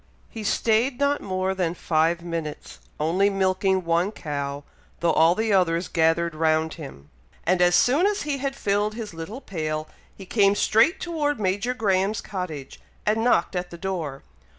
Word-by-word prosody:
He 225 Hz, -2 st, -6 dB
stayed 230 Hz, +4 st, +1 dB
not 285 Hz, 0 st, +1 dB
more 185 Hz, 0 st, -1 dB
than 180 Hz, -3 st, -1 dB
five 165 Hz, +1 st, +1 dB
minutes, 165 Hz, -3 st, -6 dB, 0.2 s
only 175 Hz, +6 st, +2 dB
milking 190 Hz, -1 st, +1 dB
one 170 Hz, +4 st, +1 dB
cow, 145 Hz, -5 st, -4 dB, 0.4 s
though 170 Hz, -, +2 dB
all 165 Hz, +2 st, +5 dB
the 220 Hz, 0 st, 0 dB
others 175 Hz, -2 st, +2 dB
gathered 165 Hz, 0 st, +1 dB
round 160 Hz, 0 st, +1 dB
him, 135 Hz, -, -11 dB, 0.3 s
and 180 Hz, +1 st, +2 dB
as 175 Hz, 0 st, +5 dB
soon 280 Hz, -, +4 dB
as 415 Hz, 0 st, -1 dB
he 290 Hz, -2 st, -2 dB
had 270 Hz, 0 st, -2 dB
filled 210 Hz, -2 st, 0 dB
his 220 Hz, -5 st, -6 dB
little 165 Hz, +11 st, -7 dB
pail, 155 Hz, -, -3 dB, 0.3 s
he 195 Hz, -, -9 dB
came 200 Hz, 0 st, +3 dB
straight 235 Hz, -, +3 dB
toward 300 Hz, -6 st, -1 dB
Major 205 Hz, +5 st, 0 dB
Graham's 200 Hz, -2 st, +1 dB
cottage, 165 Hz, -8 st, -6 dB, 0.3 s
and 220 Hz, +1 st, +1 dB
knocked 215 Hz, -6 st, +2 dB
at 180 Hz, 0 st, -2 dB
the 170 Hz, -, -9 dB
door. 165 Hz, -7 st, -4 dB
185 Hz, 165 wpm, -24 LUFS, 165-215 Hz, 0.4 s, all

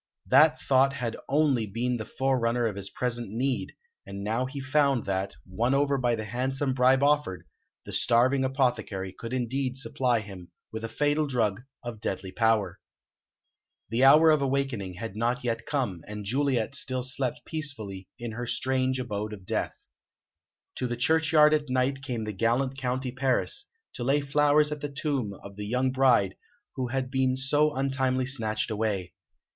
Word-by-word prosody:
That 150 Hz, +4 st, +5 dB
thought 135 Hz, +1 st, +3 dB
had 120 Hz, -4 st, -3 dB
only 135 Hz, -6 st, +2 dB
been 120 Hz, +4 st, -1 dB
the 110 Hz, -, -5 dB
forerunner 125 Hz, -2 st, 0 dB
of 110 Hz, -4 st, -1 dB
his 100 Hz, 0 st, -2 dB
present 120 Hz, -3 st, -3 dB
need, 125 Hz, +5 st, -2 dB, 0.3 s
and 100 Hz, 0 st, -7 dB
now 115 Hz, +5 st, -1 dB
he 140 Hz, +2 st, -6 dB
found 140 Hz, -2 st, +1 dB
that, 95 Hz, 0 st, -2 dB
won 115 Hz, +8 st, 0 dB
over 140 Hz, 0 st, +2 dB
by 120 Hz, -3 st, +1 dB
the 110 Hz, -1 st, -5 dB
handsome 130 Hz, +4 st, -1 dB
bribe 130 Hz, +1 st, +4 dB
offered, 145 Hz, -10 st, +1 dB, 0.4 s
the -, -, -8 dB
starving 130 Hz, +3 st, +3 dB
apothecary 120 Hz, -8 st, -1 dB
could 115 Hz, +4 st, -8 dB
indeed 130 Hz, +1 st, -2 dB
supply 125 Hz, -3 st, 0 dB
him 95 Hz, -4 st, -10 dB, 0.2 s
with 110 Hz, 0 st, -6 dB
a 115 Hz, -, -3 dB
fatal 145 Hz, +5 st, +1 dB
drug 115 Hz, -6 st, 0 dB, 0.2 s
of 120 Hz, -3 st, -7 dB
deadly 95 Hz, -2 st, -3 dB
power. 110 Hz, -4 st, +1 dB, 1.1 s
The 115 Hz, +4 st, +1 dB
hour 155 Hz, +4 st, +8 dB
of 155 Hz, -2 st, +3 dB
awakening 135 Hz, -9 st, -1 dB
had 105 Hz, +2 st, -6 dB
not 120 Hz, +3 st, -1 dB
yet 115 Hz, -2 st, -2 dB
come, 130 Hz, -, -2 dB
and 105 Hz, 0 st, -7 dB
Juliet 130 Hz, +1 st, 0 dB
still 130 Hz, -2 st, 0 dB
slept 130 Hz, 0 st, -2 dB
peacefully 110 Hz, -, -2 dB
in 120 Hz, -1 st, -5 dB
her 120 Hz, +2 st, -5 dB
strange 130 Hz, +1 st, 0 dB
abode 105 Hz, -3 st, -4 dB
of 95 Hz, -3 st, -10 dB
death. -, -, -2 dB, 1.0 s
To 125 Hz, -, -1 dB
the 120 Hz, 0 st, -3 dB
churchyard 155 Hz, +2 st, +4 dB
at 150 Hz, -2 st, 0 dB
night 130 Hz, +2 st, 0 dB
came 125 Hz, -4 st, -4 dB
the 105 Hz, 0 st, -4 dB
gallant 120 Hz, +6 st, 0 dB
County 130 Hz, -1 st, -2 dB
Paris, 130 Hz, -, 0 dB, 0.3 s
to 120 Hz, -, -5 dB
lay 135 Hz, +4 st, +2 dB
flowers 150 Hz, +1 st, +3 dB
at 150 Hz, -1 st, -4 dB
the 145 Hz, -, -3 dB
tomb 140 Hz, -8 st, -2 dB
of 100 Hz, 0 st, -11 dB
the 105 Hz, -, -5 dB
young 125 Hz, +3 st, +1 dB
bride 125 Hz, -8 st, +3 dB, 0.4 s
who 130 Hz, -2 st, -2 dB
had 130 Hz, +1 st, -3 dB
been 130 Hz, -1 st, +1 dB
so 145 Hz, +3 st, +2 dB
untimely 130 Hz, -1 st, 0 dB
snatched 115 Hz, -4 st, -2 dB
away. 105 Hz, -4 st, -2 dB
125 Hz, 170 wpm, -27 LUFS, 110-135 Hz, 1.1 s, hour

